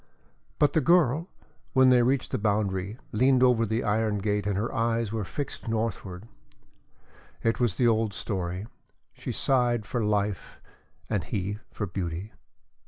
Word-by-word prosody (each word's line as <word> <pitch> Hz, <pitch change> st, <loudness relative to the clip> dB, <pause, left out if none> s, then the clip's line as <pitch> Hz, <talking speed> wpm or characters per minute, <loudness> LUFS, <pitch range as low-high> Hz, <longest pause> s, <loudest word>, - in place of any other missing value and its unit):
But 145 Hz, -, +3 dB
the 160 Hz, -, +3 dB
girl, 165 Hz, 0 st, +3 dB, 0.5 s
when 130 Hz, -1 st, +6 dB
they 125 Hz, -1 st, +6 dB
reached 130 Hz, +2 st, +1 dB
the -, -, -1 dB
boundary, 100 Hz, -1 st, 0 dB
leaned 130 Hz, +3 st, +4 dB
over 120 Hz, -3 st, +4 dB
the 110 Hz, +3 st, -1 dB
iron 105 Hz, 0 st, +1 dB
gate 105 Hz, 0 st, -1 dB
and 100 Hz, -2 st, 0 dB
her 110 Hz, +4 st, -2 dB
eyes 115 Hz, -3 st, 0 dB
were 110 Hz, -2 st, -1 dB
fixed 140 Hz, +6 st, -5 dB
northwards. 110 Hz, -4 st, -3 dB, 1.2 s
It 115 Hz, 0 st, +1 dB
was 120 Hz, -7 st, +1 dB
the 125 Hz, -, +3 dB
old 110 Hz, -2 st, +2 dB
story 95 Hz, -1 st, -3 dB, 0.5 s
she -, -, -6 dB
sighed 120 Hz, -4 st, +1 dB
for 120 Hz, +1 st, -2 dB
life 105 Hz, -3 st, -1 dB, 0.5 s
and 105 Hz, -5 st, -1 dB
he 100 Hz, +1 st, -3 dB
for 105 Hz, -, -4 dB
beauty. 90 Hz, +1 st, -4 dB
110 Hz, 150 wpm, -27 LUFS, 100-120 Hz, 1.2 s, when